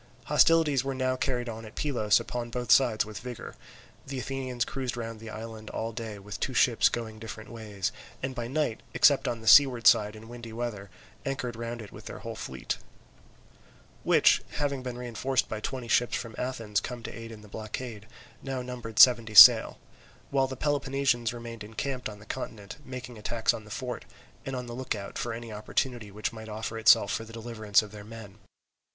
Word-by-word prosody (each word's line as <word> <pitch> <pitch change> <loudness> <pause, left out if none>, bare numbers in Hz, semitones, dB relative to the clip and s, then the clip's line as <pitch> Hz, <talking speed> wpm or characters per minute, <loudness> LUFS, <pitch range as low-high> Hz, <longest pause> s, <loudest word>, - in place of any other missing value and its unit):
Hostilities 155 -5 +4
were 135 0 -3
now 130 0 0
carried 125 -2 -1
on 115 -1 -6
at 110 0 -11
Pylos 115 -8 +2
upon 120 -1 -4
both 120 -1 -2
sides 120 -6 +5
with 105 -3 -7
vigour. 125 0 -8 0.5
The 135 -1 -5
Athenians 130 -2 -2
cruised 130 -3 -4
round 115 -1 -5
the 115 0 -9
island 110 0 -8
all 115 +1 -3
day 110 -2 -6
with 100 0 -8
two 130 - -2
ships 120 -1 +4
going 110 -2 -5
different 110 0 -8
ways; 105 -4 -4 0.3
and 130 0 -2
by 120 -2 -4
night, 140 -3 -1
except - - +5
on 115 -1 -2
the 110 - -9
seaward 130 -4 +7
side 105 0 +5
in 110 +1 -11
windy 120 -1 -9
weather, 110 -4 -4 0.3
anchored 135 -4 -3
round 115 0 -5
it 105 - -12
with - - -12
their - - -7
whole - - -6
fleet, - - -4 1.2
which, - - +5
having 140 -2 -1
been 125 -1 -5
reinforced 125 +2 -1
by 110 - -4
twenty 125 +2 -4
ships 120 +2 +2
from 115 -2 -7
Athens 115 -5 -2
come 120 -2 -6
to - - -7
aid 115 0 -8
in 110 -2 -10
the - - -13
blockade, 110 +1 -6 0.3
now 135 -2 -4
numbered 120 -3 -7
seventy 115 -4 +7
sail; - - +10 0.5
while 135 -1 +2
the 130 -1 -7
Peloponnesians 135 -4 +1
remained 115 -2 -8
encamped 120 +4 -4
on 105 - -9
the 105 - -15
continent, 105 -2 -6
making 125 -3 -8
attacks 115 +1 +1
on 110 - -7
the - - -13
fort, 125 +3 -5 0.4
and 135 - -3
on 125 -1 -4
the 120 - -7
look 130 -1 -3
out 100 -1 -6
for 120 - -2
any 115 -1 -6
opportunity 110 +1 -2
which 105 +3 -3
might 110 -1 -9
offer 110 +1 -4
itself 110 - +6
for 115 - -2
the 115 - -12
deliverance 110 -2 +1
of 105 - -10
their 105 -1 -9
men. 110 -1 -11
115 Hz, 195 wpm, -28 LUFS, 110-125 Hz, 1.2 s, sail